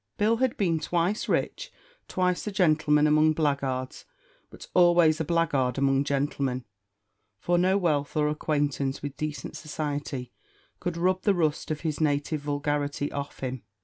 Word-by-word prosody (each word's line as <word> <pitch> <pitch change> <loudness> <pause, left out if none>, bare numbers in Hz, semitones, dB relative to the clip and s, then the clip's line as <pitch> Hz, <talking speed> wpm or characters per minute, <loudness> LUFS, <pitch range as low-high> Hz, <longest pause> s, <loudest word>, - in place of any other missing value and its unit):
Bill 220 +2 +2
had 260 +2 0
been 170 -5 +1
twice 175 +6 -1
rich; - - -1 0.4
twice 180 +1 0
a - - -1
gentleman 155 -5 +3
among 155 +1 +4
blackguards, 140 -4 -1 0.5
but - - -12
always 175 -3 +5
a - - +1
blackguard 145 -6 +1
among 135 0 +2
gentlemen; 140 -3 -1 0.7
for 175 - +1
no 185 +2 +3
wealth 155 -6 0
or 150 0 +3
acquaintance 145 -3 -1
with 145 -1 -5
decent 150 -4 -5
society 145 -4 -4 0.5
could 175 -1 -3
rub 185 +2 +1
the 200 -1 +2
rust 155 -4 0
of 155 -1 -3
his 155 -2 -2
native 145 0 0
vulgarity 145 0 -2
off 140 0 -6
him. 130 -2 -4
150 Hz, 145 wpm, -27 LUFS, 140-170 Hz, 0.7 s, always